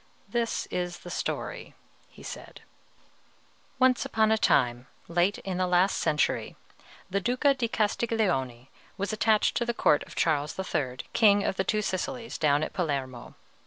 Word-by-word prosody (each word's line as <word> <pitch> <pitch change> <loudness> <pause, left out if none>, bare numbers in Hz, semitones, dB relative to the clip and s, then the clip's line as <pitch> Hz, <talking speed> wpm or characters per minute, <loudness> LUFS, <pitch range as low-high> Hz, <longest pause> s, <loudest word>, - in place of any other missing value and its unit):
"This 235 -1 -1
is 175 -1 -2
the 175 - -7
story," - - -4 0.3
he - - -15
said. - - -9 1.2
"Once 255 -1 +3
upon 220 -1 +2
a - - +5
time, 120 - +2 0.2
late 175 +4 +1
in 190 -2 -4
the 185 - +1
last 180 +2 +3
century, 155 -2 0 0.5
the 200 +2 -1
Duca 255 +6 +2
di 255 -3 -1
Castiglione 205 - -1 0.3
was 200 +2 -2
attached 215 0 +2
to - - +1
the 235 0 -2
court 150 - +3
of - - -12
Charles 150 -2 0
III., 135 -9 -2 0.2
King 205 -3 +5
of - - -1
the 190 - 0
Two 210 +1 0
Sicilies, 230 +6 -3
down 145 -1 +3
at - - -4
Palermo. 135 -8 -3
190 Hz, 155 wpm, -28 LUFS, 150-225 Hz, 1.2 s, a